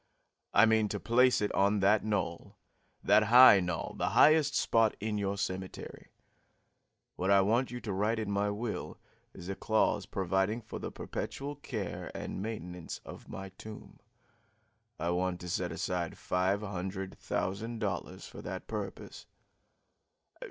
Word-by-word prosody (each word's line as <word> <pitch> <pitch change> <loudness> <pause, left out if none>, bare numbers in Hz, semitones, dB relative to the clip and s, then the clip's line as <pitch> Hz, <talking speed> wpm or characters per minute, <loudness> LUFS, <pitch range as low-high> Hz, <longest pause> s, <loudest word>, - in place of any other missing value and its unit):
I - - +6
mean 110 -1 +3
to 105 - -3
place 125 +3 +3
it 105 - 0
on 100 +1 +3
that 105 +2 +4
knoll 95 -6 -3 0.5
that 110 - +5
high 120 -2 +9
knoll 90 -3 -3
the - - 0
highest 155 -2 +6
spot 115 -2 +2
in 105 0 -2
your 100 0 -1
cemetery. 95 -1 -5 1.1
What 95 +2 -1
I 100 0 +6
want 115 +6 +2
you 125 - -5
to 105 - -4
write 105 +4 +1
into 110 -2 -2
my 100 +1 +1
will 105 +2 -4 0.4
is 85 - -9
a 95 - -2
clause 105 -1 +1
providing 95 +4 0
for - - -7
the - - -5
perpetual 140 +1 -5
care 110 -9 -5
and - - -5
maintenance 90 -6 -6
of - - -11
my 95 0 -7
tomb. 110 -1 -10 1.0
I 85 +2 0
want 90 0 -1
to 90 - -6
set - - -1
aside 90 -2 -3
five 95 +3 0
hundred 95 -1 -5
thousand 110 +5 -3
dollars 105 -4 -4
for - - -10
that - - -6
purpose." - - -6
100 Hz, 150 wpm, -31 LUFS, 95-110 Hz, 1.1 s, high